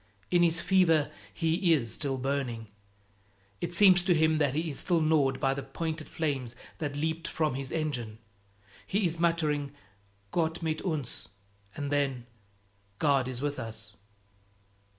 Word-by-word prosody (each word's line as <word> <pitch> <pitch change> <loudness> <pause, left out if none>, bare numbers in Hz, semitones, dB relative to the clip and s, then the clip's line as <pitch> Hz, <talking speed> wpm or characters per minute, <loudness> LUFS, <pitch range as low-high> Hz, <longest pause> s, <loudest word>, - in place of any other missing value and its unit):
In 175 -1 +4
his 170 -1 +4
fever 165 -5 +3 0.2
he 170 +1 +2
is 115 -8 0
still 135 -3 -2
burning; 125 -4 -2 0.9
it 175 0 -1
seems 185 -1 +7
to 180 -1 +3
him 160 0 +3
that 145 -3 +1
he 160 +1 -1
is 140 - -2
still 175 -2 +2
gnawed 150 -4 +2
by 135 0 +2
the 140 - -4
pointed 155 +4 -4
flames 135 -7 -2 0.2
that 145 -2 -3
leaped 160 +2 -2
from 155 -3 0
his 135 0 -4
engine. 125 -9 -2 0.7
He 200 0 +1
is 165 -1 -1
muttering, 155 -4 +1 0.6
"Gott 165 0 0
mit 155 -1 -1
uns!" 150 - -3 0.5
and 145 0 -4
then, 135 -4 0 0.7
"God 140 -2 +2
is 130 +1 -4
with 145 0 -2
us!" 110 -1 -7
150 Hz, 150 wpm, -29 LUFS, 135-165 Hz, 0.9 s, seems